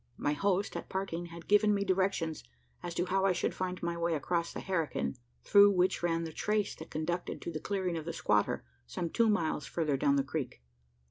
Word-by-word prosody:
My 145 - 0
host, 195 +4 0
at - - -5
parting, 180 -3 -3
had 170 0 -11
given 210 0 +5
me 200 0 0
directions 185 -4 0 0.4
as 170 - -5
to 175 - +1
how 190 +1 +1
I 195 -1 +4
should 175 - -1
find 185 -1 -4
my 170 0 -1
way 170 -1 0
across 170 +3 -1
the - - -6
herrikin 165 -9 -1 0.3
through 205 0 +7
which 185 0 +2
ran 165 -1 +1
the 160 -1 -6
trace 210 +3 0
that - - -9
conducted 175 +3 -3
to - - -4
the 155 - -4
clearing 185 0 -2
of 160 -2 -4
the 170 - -3
squatter, 105 -8 +1 0.2
some 165 - -3
two 230 -1 +3
miles 160 -8 0
further 150 -5 0
down 140 +1 +3
the 140 - +2
creek. 135 - -4
170 Hz, 210 wpm, -32 LUFS, 160-190 Hz, 0.4 s, through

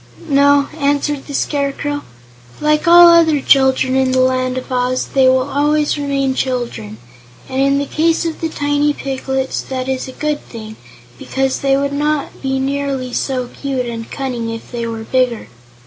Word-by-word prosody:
"No," 280 0 +4
answered 285 0 0
the 285 - -7
Scarecrow; 290 0 -2 0.6
"like 300 +1 +1
all 345 +1 +9
other 330 -3 +5
children 265 -1 +3
in 260 -1 +2
the 260 - +2
Land 255 0 +1
of 255 +1 -6
Oz, 250 0 0
they 265 -1 +4
will 260 0 +3
always 295 +1 +1
remain 275 -2 -1
children, 240 - -3 0.5
and 260 0 -2
in 275 0 +3
the 285 - -1
case 325 +4 0
of 325 -1 -4
the 325 - -1
tiny 290 0 0
piglets 265 -1 -3
that 260 -1 -5
is 265 0 -2
a - - -7
good 300 +1 -3
thing, 220 -2 -10 0.4
because 265 0 -1
they 275 0 +2
would 280 0 -1
not 295 0 -2
be 265 0 -1
nearly 270 -2 -2
so 255 -2 -2
cute 270 -3 -3
and 230 -1 -6
cunning 250 -4 -4
if 225 0 -7
they 235 -1 -3
were 225 -1 -5
bigger." 250 -1 -1
270 Hz, 170 wpm, -17 LUFS, 255-290 Hz, 0.6 s, all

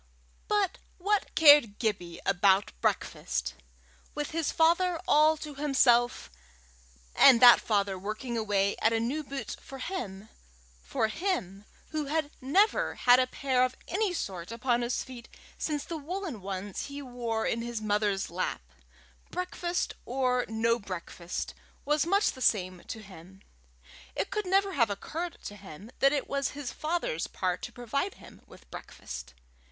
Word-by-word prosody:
But 410 -3 +1 0.2
what 405 +2 0
cared 290 -9 +7
Gibbie 180 -7 -2
about 195 +1 +3
breakfast! 65 0 -1 0.6
With 295 -1 -3
his 325 -1 -1
father 340 +1 +3
all 310 +1 +5
to 300 -1 -7
himself, 250 - +2 0.8
and 260 -4 +8
that 245 0 +9
father 200 -3 0
working 215 +5 -4
away 205 -3 +1
at 225 - +3
a 225 - +2
new 265 +7 -2
boot 275 -1 -6
for 270 - -10
him 220 - -5 0.5
for 65 - -1
him 220 - -3 0.3
who 310 -1 -2
had 300 0 -1
never 400 - +2
had 245 0 +5
a 255 - +2
pair 255 -1 +1
of 255 0 -1
any 405 +1 0
sort 190 - -4
upon 240 +1 0
his 240 +1 -1
feet 245 -2 -11 0.3
since 295 -2 -2
the 335 - -5
woollen 320 - -5
ones 195 +1 -5
he 285 0 -7
wore 240 -3 -3
in 230 - 0
his 235 -1 -4
mother's 205 -3 0
lap, 170 - -3 0.6
breakfast 360 -1 -2
or 250 -1 0
no 230 +2 +1
breakfast 180 -3 -6 0.3
was 300 +2 +2
much 400 +3 +3
the 260 - -12
same 185 -6 +1
to 220 - -6
him. 190 0 -14 0.7
It - - -2
could 420 -3 -2
never 390 +1 +2
have 230 -8 +3
occurred 325 - -4
to 205 - -7
him 200 +2 -11
that 275 - +5
it 285 -2 -1
was 275 -1 -1
his 280 -4 -5
father's 310 - -2
part 180 -1 -2
to 245 - -6
provide 260 - -3
him - - -15
with - - -16
breakfast. - - -9
245 Hz, 150 wpm, -29 LUFS, 200-305 Hz, 0.8 s, that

